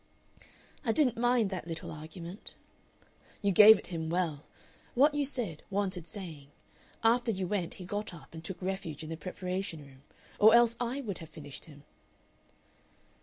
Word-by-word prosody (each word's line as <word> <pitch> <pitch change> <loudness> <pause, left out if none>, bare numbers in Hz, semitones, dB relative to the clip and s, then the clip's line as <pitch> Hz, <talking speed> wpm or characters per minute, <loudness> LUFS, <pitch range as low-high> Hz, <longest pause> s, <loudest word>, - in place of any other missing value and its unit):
"I 225 - +2
didn't 255 -5 +3
mind 240 -4 +3
that 185 -3 -4
little 165 -1 -5
argument." 165 +5 -9 0.9
"You 200 - +3
gave 215 +3 +10
it - - -10
him 160 -1 -3
well. 165 -4 -1 0.5
What 285 +4 +5
you 290 -1 +1
said 230 - -3
wanted 190 -4 -2
saying. 160 -7 -8 0.6
After 235 +1 +3
you 190 -3 -2
went 180 -2 -2
he 185 - -8
got 205 +3 -3
up 170 -2 -13
and 160 0 -8
took 190 - -6
refuge 185 -5 -4
in 155 - -7
the - - -2
preparation 185 -2 -4
room. 135 -1 -17 0.4
Or 220 +2 +8
else 235 -1 +5
I 245 +3 -2
would 200 -9 -5
have 165 - -10
finished 145 -4 -10
him." 145 -3 -15
185 Hz, 165 wpm, -31 LUFS, 160-220 Hz, 0.9 s, gave